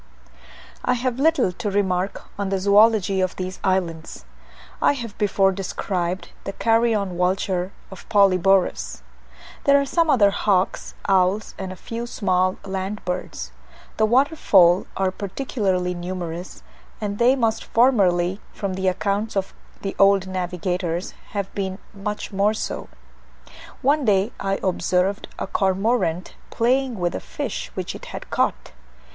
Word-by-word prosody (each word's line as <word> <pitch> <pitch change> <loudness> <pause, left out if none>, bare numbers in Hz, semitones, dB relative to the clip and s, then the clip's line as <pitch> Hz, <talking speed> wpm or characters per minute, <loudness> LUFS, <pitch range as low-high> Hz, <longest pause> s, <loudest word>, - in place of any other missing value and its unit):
I - - +2
have 250 0 -1
little 320 - +3
to 210 +4 -4
remark 190 -1 0 0.2
on 200 -1 -1
the 195 - +1
zoology 200 0 +4
of 185 -1 -1
these 185 0 -5
islands. 170 - -2 0.6
have 235 -7 +1
before 195 -1 +3
described 185 -1 -3
the 195 - -5
carrion 225 -5 +1
vulture 185 0 0 0.2
of 190 - -12
Polyborus. 195 - +3 0.6
There 280 0 +6
are 280 - 0
some 330 +3 +1
other 205 -8 +5
hawks, 195 -2 0
owls, 195 +2 +2
and 190 -1 -4
a - - -7
few 230 +5 -6
small 185 -4 +1
land 195 +2 -4
birds. 180 - -4 0.5
The 220 - +3
water 270 +7 +3
fowl 180 - +5
are 190 -1 +1
particularly 190 -3 -2
numerous, 175 0 -6 0.4
and 205 -1 -3
they 245 +3 +5
must 225 -4 0
formerly, 195 -6 +3
from 200 -2 -3
the 190 0 -1
accounts 200 +3 0
of 195 0 -2 0.3
the 195 - -3
old 195 -1 +5
navigators, 180 -1 -2 0.2
have 200 -2 -3
been 190 -2 -3 0.2
much 210 +1 -5
more 205 +2 +2
so. - - -4 0.9
One 285 +3 +3
day 200 +1 +3
I 195 0 0
observed 185 +2 0
a - - -3
cormorant 190 -2 0 0.2
playing 250 +1 +1
with 175 -2 -1
a - - -3
fish - - -5
which - - -3
it - - -9
had - - -8
caught. - - 0
195 Hz, 140 wpm, -23 LUFS, 185-215 Hz, 0.9 s, There